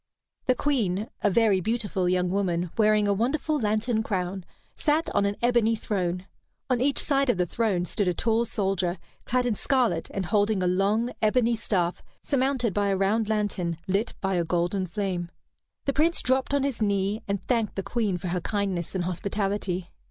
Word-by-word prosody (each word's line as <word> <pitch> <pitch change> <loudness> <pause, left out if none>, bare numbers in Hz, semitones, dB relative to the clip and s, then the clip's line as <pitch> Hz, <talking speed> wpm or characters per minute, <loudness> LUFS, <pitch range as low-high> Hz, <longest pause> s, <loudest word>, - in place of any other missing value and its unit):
The 255 - +4
Queen, 220 -8 0
a 205 - +3
very 205 -2 +3
beautiful 205 -4 -1
young 180 0 +1
woman, 180 -3 0
wearing 215 -1 +3
a 200 - +3
wonderful 285 +8 0
lantern 220 +1 +1
crown, 190 -3 -2 0.3
sat 310 +1 +1
on 200 - +2
an 200 - -1
ebony 235 -2 +3
throne. 185 -4 -2 0.5
On 245 -1 +2
each 275 +1 +2
side 275 -2 +2
of 245 - +3
the 180 - +2
throne 190 -2 0
stood 200 +2 -1
a 180 - +2
tall 225 +4 +1
soldier, 190 -4 -1 0.3
clad 250 0 +1
in 240 - +1
scarlet 255 +2 +1
and 195 -2 -2
holding 205 0 +2
a - - +2
long 205 +6 +1
ebony 235 +2 +3
staff 180 -6 -1 0.2
surmounted 260 -5 +1
by 205 +1 +1
a 195 -1 +1
round 210 +3 +1
lantern 200 -6 -1
lit 200 +5 0
by 195 0 0
a 175 -2 +1
golden 175 +3 0
flame. 180 -2 -3 0.6
The 275 - +1
Prince 320 +4 +2
dropped 260 +2 +1
on 280 - +1
his 275 -5 -2
knee, 200 0 +1
and 200 -1 -2
thanked 230 -4 0
the 195 - -2
Queen 205 -2 -1
for 175 +1 -4
her 180 0 -1
kindness 195 -3 -2
and 185 - 0
hospitality. 190 0 -2
205 Hz, 180 wpm, -26 LUFS, 185-235 Hz, 0.6 s, The